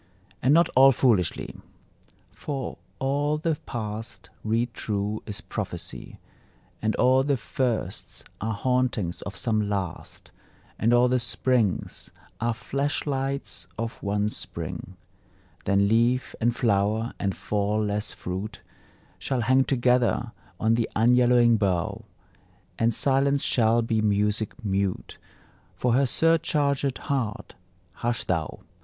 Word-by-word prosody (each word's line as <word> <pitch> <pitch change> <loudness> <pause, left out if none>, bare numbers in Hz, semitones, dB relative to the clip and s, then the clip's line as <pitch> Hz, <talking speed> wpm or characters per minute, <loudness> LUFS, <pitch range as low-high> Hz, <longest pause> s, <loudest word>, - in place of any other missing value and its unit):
And 130 - +3
not 170 +3 +6
all 135 +1 +7
foolishly: 110 - +1 0.8
For 135 -4 -5 0.2
all 145 +3 0
the 160 0 0
past, 110 -1 -6
read 115 +2 0
true, 105 0 -2
is 105 - -4
prophecy, - - -6 0.6
And 110 0 0
all 130 +1 +4
the 140 -1 +1
firsts 115 -4 -3 0.2
are 110 +1 -1
hauntings 125 -6 0
of 100 -1 -7
some 110 -4 0
Last, 95 -4 -5 0.5
And 115 - +3
all 120 +1 +5
the 125 0 +2
springs 115 -3 0 0.3
are 115 0 0
flash 140 +5 -2
lights 135 - -3
of 115 0 -4
one 105 +1 0
Spring. - - -7 0.7
Then 100 0 +3
leaf, 120 +4 +2
and 120 +1 +2
flower, 110 -1 +1
and 100 -2 -1
fall 105 +1 -1
less 105 +1 -1
fruit 95 +4 -5 0.6
Shall 130 -3 -1
hang 130 +3 +3
together 125 -2 +2 0.3
on 110 +1 +3
the 115 0 0
unyellowing 120 0 +5
bough; 95 -5 -1 0.7
And 115 0 +3
silence 140 +3 +2
shall 115 0 +3
be 115 -1 0
Music 105 +3 0
mute 95 -1 -2 0.6
For 125 -2 +1
her 135 +3 +4
surchargèd 145 -3 +2
heart. 130 -8 -3 0.4
Hush 120 0 -1
thou! 80 -4 -2
115 Hz, 120 wpm, -26 LUFS, 105-130 Hz, 0.8 s, all